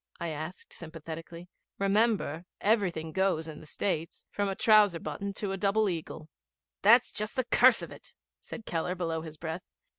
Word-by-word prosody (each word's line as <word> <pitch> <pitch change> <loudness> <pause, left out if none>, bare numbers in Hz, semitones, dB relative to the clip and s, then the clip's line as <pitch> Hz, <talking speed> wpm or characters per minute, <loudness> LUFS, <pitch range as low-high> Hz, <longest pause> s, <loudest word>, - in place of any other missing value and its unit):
I 170 - -3
asked 155 +3 -7
sympathetically. 165 +1 -8 0.3
'Remember, 200 -5 +1
everything 185 -7 +1
goes 190 -3 +1
in 155 -2 -8
the 155 - -12
States, 165 -1 -2
from 205 -1 -1
a 195 - -2
trouser 210 -6 +5
button 160 +7 -4
to 205 -2 -3
a 195 - -2
double 205 +2 +2
eagle.' 165 -3 -5 0.5
'That's 230 +4 +6
just 215 +3 -2
the 255 - +1
curse - - +5
of - - -7
it,' - - -13 0.3
said 225 - -9
Keller 170 +2 -2
below 165 -3 -2
his 160 -1 -9
breath. 160 +3 -4
180 Hz, 170 wpm, -30 LUFS, 160-205 Hz, 0.5 s, That's